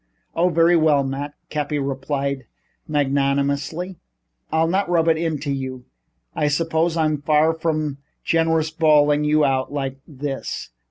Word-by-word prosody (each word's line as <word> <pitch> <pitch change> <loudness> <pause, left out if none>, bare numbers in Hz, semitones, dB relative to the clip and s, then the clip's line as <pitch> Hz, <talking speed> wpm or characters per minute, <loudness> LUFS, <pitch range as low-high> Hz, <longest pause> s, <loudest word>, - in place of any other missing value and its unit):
"Oh, 175 +2 +3
very 170 +1 +4
well, 155 -4 +4
Matt," 140 +2 -4 0.2
Cappy 150 0 -1
replied 140 -1 -2 0.4
magnanimously, 140 +4 0 0.5
"I'll 160 +1 +3
not 190 +2 0
rub 170 -2 +2
it 165 - +5
into 155 -3 -2
you. 130 -2 -4 0.5
I 150 - +1
suppose 165 +2 +1
I'm 155 -2 +1
far 155 +2 +3
from 155 -3 -2 0.2
generous, 160 -1 +1
bawling 150 -2 +3
you 150 0 +3
out 130 -1 0
like 135 -2 -3
this. 135 - -5
150 Hz, 130 wpm, -22 LUFS, 140-160 Hz, 0.5 s, it